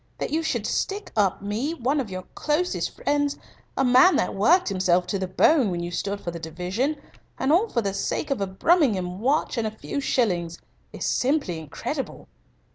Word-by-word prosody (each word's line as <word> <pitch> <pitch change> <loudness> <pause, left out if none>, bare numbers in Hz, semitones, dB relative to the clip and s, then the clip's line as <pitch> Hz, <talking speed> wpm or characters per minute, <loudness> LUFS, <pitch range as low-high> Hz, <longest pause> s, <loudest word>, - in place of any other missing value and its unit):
That - - -3
you 320 +2 +1
should 250 -9 -1
stick 405 - -2
up 200 -2 +1
me, 230 +11 -2
one 275 +2 0
of 250 -6 -3
your 185 -1 -5
closest 315 +4 0
friends, 290 0 0 0.4
a 270 - +3
man 255 +9 +6
that - - +1
worked 335 - +4
himself 185 -2 +2
to 195 +2 -2
the 190 - -2
bone 245 - +4
when 175 -1 -2
you 175 - -4
stood 200 +3 -2
for 170 - -5
the 170 - -7
division 180 - -2 0.4
and 265 - +1
all 390 +7 +4
for 235 - 0
the 195 -1 -1
sake 285 +8 -2
of 270 - 0
a 195 - 0
Brummagem 190 - +2
watch 265 +1 +1
and 220 - 0
a 215 0 -7
few 280 - -4
shillings 175 -11 0 0.3
is - - -5
simply 255 - 0
incredible." 155 -3 -5
220 Hz, 195 wpm, -25 LUFS, 185-290 Hz, 0.4 s, man